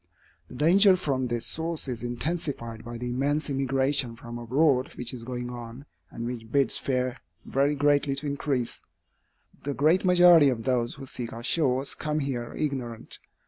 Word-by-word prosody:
The - - -12
danger 185 +8 +6
from 135 -8 -1
this 120 -1 -1
source 165 -2 -2
is 120 -3 -4
intensified 120 -2 -3
by 120 0 -7
the 125 +1 -4
immense 145 +4 0
immigration 135 -2 0
from 120 -1 -8
abroad 130 +2 +2
which 120 0 -3
is 120 -2 -6
going 125 0 -5
on, 120 +2 -9 0.2
and 115 - -6
which 115 -2 -6
bids 140 -1 +4
fair 130 -1 -1 0.3
very 140 +2 +1
greatly 145 -1 +2
to 140 +2 -3
increase. 140 -4 -2 0.8
The 140 -1 -3
great 160 +6 +3
majority 175 -5 +7
of 115 -3 -2
those 125 -2 0
who 135 0 -9
seek 125 -1 -4
our 115 - -8
shores, 135 -2 +1
come 150 0 -3
here 130 -5 -3
ignorant. 130 -6 -3
135 Hz, 165 wpm, -27 LUFS, 120-145 Hz, 0.8 s, majority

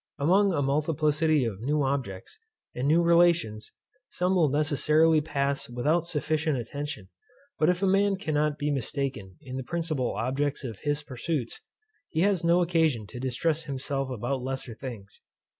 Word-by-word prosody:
Among 190 +8 +3
a 145 -5 0
multiplicity 150 0 +1
of 105 -3 -4
new 145 +4 +1
objects, 135 - -3 0.3
and 125 +3 -2
new 165 +3 +4
relations, 170 -10 +3 0.4
some 180 +1 0
will 170 -5 +3
necessarily 155 +2 +3
pass 140 -3 -2
without 150 +8 0
sufficient 155 -2 0
attention; 120 -4 -6 0.5
but 155 - +4
if 180 +2 0
a - - +4
man 195 +1 +3
be 190 -5 -4
not 150 0 0
mistaken 135 -8 -2
in 130 -1 -6
the 130 - -4
principal 155 -4 -2
objects 135 +4 -1
of 115 -5 -6
his 145 0 -1
pursuits, 130 -1 -4 0.5
he 160 - -1
has 195 -3 +2
no 170 +1 +4
occasion 160 -10 +1
to 125 - -8
distress 150 +5 -1
himself 135 0 -3
about 125 +2 -2
lesser 130 -2 -4
things. 110 -5 -9
145 Hz, 155 wpm, -27 LUFS, 130-165 Hz, 0.5 s, new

